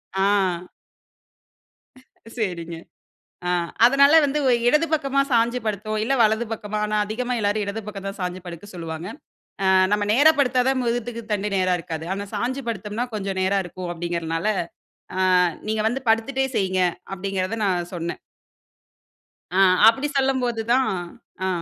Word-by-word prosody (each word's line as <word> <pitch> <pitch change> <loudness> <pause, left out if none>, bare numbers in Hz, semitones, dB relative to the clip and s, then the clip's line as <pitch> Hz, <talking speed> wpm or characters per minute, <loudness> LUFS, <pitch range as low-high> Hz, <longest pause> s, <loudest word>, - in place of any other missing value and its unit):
ஆ. 190 -3 +1 1.7
சரிங்க. 170 -6 -3 0.7
ஆ - - +1 0.3
அதுனால 280 +5 +6
வந்து 285 +1 -1
உ - - +5 0.2
இடது 300 +5 +3
பக்கமா 275 -2 +2
சாஞ்சு 235 +1 +2
படுத்தோம், 215 +1 -2
இல்ல 260 +5 0
வலது 220 +2 +2
பக்கமா 215 -1 -4
ஆனா 210 0 -1
அதிகமா 245 +4 -3
எல்லோரும் 205 0 0
இடது 200 +3 -4
பக்கம் 195 -2 -6
தான் 195 - -6
சாஞ்சு 180 0 -3
படுக்க 170 +1 -8
சொல்லுவாங்க. 165 0 -6 0.6
ஆ - - +2 0.3
நம்ம 210 0 +2
நேரா 290 +6 +6
படுத்தா 255 -2 +3
தான் 265 -1 +1
முதுகுத் 235 -1 -3
தண்டு 210 0 -1
நேரா 185 -1 +2
இருக்காது. 160 -1 -6
ஆனா 200 +1 -4
சாஞ்சு 250 +6 -2
படுத்தோம்ன்னா 215 +3 -3
கொஞ்சம் 195 -2 -3
நேரா 195 +1 +2
இருக்கும் 175 0 -6
அப்டிங்கறனால 170 0 -3 0.7
ஆ, - - +3 0.4
"நீங்க 215 0 -1
வந்து 245 +4 0
படுத்துட்டே 245 +4 +2
செய்ங்க" 185 -1 +1 0.3
அப்டிங்கிறத 195 +2 -2
நான் 175 -3 0
சொன்னேன். 170 -1 -4 1.4
ஆ - - +3 0.3
அப்டி 270 +6 +4
சொல்லும்போது 255 -4 +1
தான் 260 +1 +3 0.6
ஆ. - - +1
210 Hz, 140 wpm, -23 LUFS, 185-245 Hz, 1.7 s, அதுனால